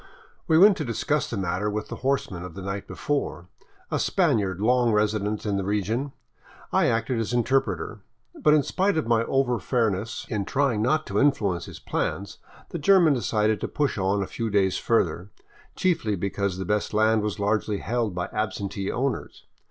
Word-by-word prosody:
We 160 -2 +4
went 200 +2 +7
to 155 - -2
discuss 115 -5 -1
the - - -3
matter 95 +2 -1
with 105 0 -4
the - - -5
horseman 130 -9 -1
of 90 -2 -9
the 95 - -7
night 100 +1 -4
before, 90 - -3 0.4
a - - 0
Spaniard 95 -4 +1
long 120 +2 +3
resident 105 0 0
in 100 -2 0
the 100 - -1
region, 105 +7 -1 0.6
I - - +4
acting 115 +2 0
as 115 +1 -2
interpreter. 115 -5 0 0.3
But 150 0 +3
in 150 - +3
spite 190 +4 0
of 160 - 0
my 115 0 +2
over 130 -3 +1
fairness 110 -1 -1
in 105 -3 -2
trying 135 -4 +1
not 155 +7 +1
to - - -1
influence 100 -12 +1
his - - -9
plans, 100 +1 -3 0.3
the 170 - -5
German 170 -1 +5
decided 110 -4 0
to - - -1
push 145 -7 -1
on 95 +1 +1
a - - -3
few 115 +4 -4
days 95 -3 +2
further, 90 -4 0 0.5
chiefly 165 - +1
because 100 0 -2
the 95 - -4
best 105 +2 -1
land 110 0 +3
was 105 -1 -2
largely 105 0 0
held 115 -2 -2
by 90 0 -2
absentee 100 -2 -2
owners. 130 -1 -3
110 Hz, 180 wpm, -25 LUFS, 100-125 Hz, 0.6 s, went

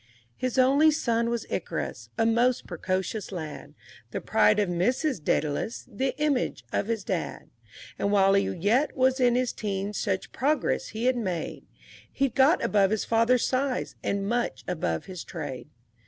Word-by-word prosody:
III 115 0 -31 0.2
His 255 - -4
only 275 +4 +5
son 235 -6 +1
was 235 -1 -2
Icarus, - - -4
a 225 - +2
most 235 +2 +2
precocious 185 +4 -3
lad, 160 -5 -7 0.3
The - - -3
pride 215 -1 +3
of 205 - +2
Mrs. 200 - 0
Dædalus, 150 - -1
the 260 +3 -3
image 295 -4 0
of 200 - 0
his 225 -3 -2
dad; - - -4 0.5
And 200 - +1
while 195 -1 +5
he 200 0 +2
yet 225 - +1
was 260 +1 +3
in 245 -1 +4
his 250 -1 0
teens 200 -1 -3
such 190 -2 -2
progress 290 +3 0
he 220 +3 -4
had 255 0 +3
made, 185 -8 -4 0.4
He'd 275 -4 0
got 275 +6 +4
above 200 -2 +3
his 220 0 -1
father's 230 +2 +3
size, 260 0 -1
and 200 0 -1
much 240 +2 -1
above 85 - -2
his 185 -3 -7
trade. 145 -5 -6
225 Hz, 165 wpm, -27 LUFS, 190-255 Hz, 0.5 s, only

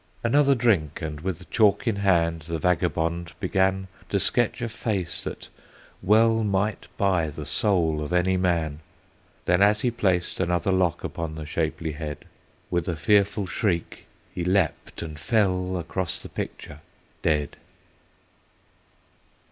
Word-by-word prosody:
Another 140 +3 +4
drink, 105 - +1
and 75 -1 -5
with 90 0 -4
chalk 105 +2 +3
in 110 -3 +1
hand, 85 -5 +1
the 85 -1 -2
vagabond 85 0 0
began 95 0 +1 0.2
To - - +1
sketch - - +1
a - - 0
face 105 -6 -1
that - - -7 0.5
well 110 +3 +4
might 105 +1 -1
buy 90 -5 +2
the 75 0 -7
soul 80 -2 +2
of 75 - -6
any 90 +1 +2
man. 85 -5 0 0.7
Then, 90 +2 +3
as 105 +1 +4
he 125 - +1
placed 95 -6 0
another 90 +2 +1
lock 90 -3 +1
upon 80 -1 -4
the 80 -1 -6
shapely 80 +1 -2
head, 75 -1 -6 0.5
With 85 -2 0
a 85 - -1
fearful 100 +5 +2
shriek, 90 -2 -2 0.3
he 90 - -3
leaped 95 0 0
and 80 -2 -7
fell 95 -3 +1
across 90 +1 -1
the - - -9
picture 75 - -6 0.4
dead. 75 -3 0
90 Hz, 140 wpm, -25 LUFS, 80-100 Hz, 0.7 s, Another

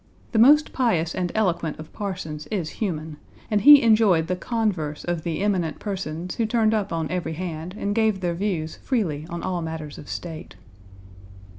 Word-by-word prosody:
The 225 - +2
most 295 +6 +6
pious 175 -11 +1
and 180 -2 -2
eloquent 175 -7 0
of 155 0 -11
parsons 160 -7 -5
is 180 -7 -2
human, 160 -6 -3 0.3
and 210 -1 +2
he 290 +5 +9
enjoyed 215 -7 +4
the 180 +2 -1
converse 185 -8 -2
of 175 -2 -2
the 165 +1 -3
"eminent 185 -6 0
persons" 180 -4 -4
who 230 - +1
turned 220 -1 +2
up 205 -2 -1
on 165 -2 -2
every 175 -3 -2
hand 170 +1 -5
and 205 -1 -1
gave 220 -2 +2
their 175 -2 -1
views 170 -4 -2
freely 165 - -2
on 170 0 -5
all 180 -2 -2
matters 160 -2 -6
of 145 - -11
state. 165 -3 -7
180 Hz, 175 wpm, -24 LUFS, 160-210 Hz, 0.3 s, he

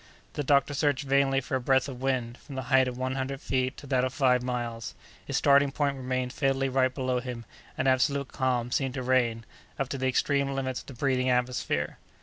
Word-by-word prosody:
The 145 - -2
doctor 140 +1 +3
searched 145 -1 +1
vainly 135 0 +2
for 135 - -8
a 130 - 0
breath 130 +2 +2
of 130 -2 -8
wind, 125 -3 -1
from 140 - -11
the 130 - -3
height 130 -1 +6
of 125 -1 -4
one 130 0 -2
hundred 135 0 -3
feet 130 0 -1
to - - -10
that 130 -2 +1
of 130 - 0
five 130 -3 +3
miles; 120 -2 -4 0.3
his - - -2
starting 140 0 +4
point 140 -1 0
remained 130 -1 -2
fatally 135 -1 +1
right 130 0 +2
below 130 -1 -1
him, 120 -2 -6 0.3
and 135 - 0
absolute 135 +1 +2
calm 125 -2 -1
seemed 135 0 0
to 130 - -3
reign, 120 -3 +1 0.3
up 135 -1 -2
to 135 - -4
the 130 - 0
extreme 140 +2 +1
limits 130 -2 -2
of - - -14
the 140 - -8
breathing 130 0 +1
atmosphere. 125 -12 -1
130 Hz, 215 wpm, -28 LUFS, 125-135 Hz, 0.3 s, height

